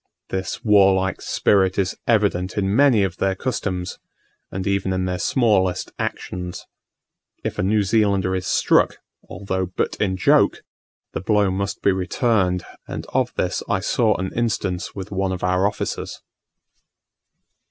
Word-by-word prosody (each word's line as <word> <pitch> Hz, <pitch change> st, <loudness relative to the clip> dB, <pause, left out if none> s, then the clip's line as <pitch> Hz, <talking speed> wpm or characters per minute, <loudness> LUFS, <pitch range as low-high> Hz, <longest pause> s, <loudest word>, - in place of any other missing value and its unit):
This 95 Hz, +4 st, -4 dB
warlike 95 Hz, -2 st, +4 dB
spirit 95 Hz, -2 st, +2 dB
is 95 Hz, -2 st, 0 dB
evident 100 Hz, -5 st, +1 dB
in 100 Hz, 0 st, +1 dB
many 130 Hz, -6 st, +5 dB
of 90 Hz, -3 st, -2 dB
their 95 Hz, -1 st, 0 dB
customs, 95 Hz, -6 st, -3 dB, 0.5 s
and 95 Hz, 0 st, -4 dB
even 100 Hz, -1 st, 0 dB
in 95 Hz, 0 st, -1 dB
their 90 Hz, -1 st, -2 dB
smallest 105 Hz, -8 st, +1 dB
actions. 90 Hz, -1 st, -4 dB, 0.8 s
If -, -, -4 dB
a -, -, +3 dB
New 105 Hz, +3 st, +2 dB
Zealander 100 Hz, -2 st, +2 dB
is 95 Hz, 0 st, -3 dB
struck, -, -, +3 dB, 0.3 s
although 95 Hz, +1 st, -3 dB
but 90 Hz, -, -2 dB
in 95 Hz, -3 st, 0 dB
joke, 90 Hz, -, +3 dB, 0.5 s
the -, -, -3 dB
blow 105 Hz, 0 st, +2 dB
must 100 Hz, +1 st, -3 dB
be 100 Hz, -, +5 dB
returned 95 Hz, -1 st, +1 dB, 0.2 s
and -, -, -5 dB
of -, -, +1 dB
this -, -, -1 dB
I -, -, +2 dB
saw -, -, +2 dB
an 95 Hz, +1 st, -3 dB
instance 100 Hz, -6 st, -2 dB
with 95 Hz, -1 st, -7 dB
one 95 Hz, -1 st, -1 dB
of 90 Hz, -, -4 dB
our 90 Hz, +2 st, +2 dB
officers. 100 Hz, -, -4 dB
95 Hz, 145 wpm, -22 LUFS, 95-100 Hz, 0.8 s, many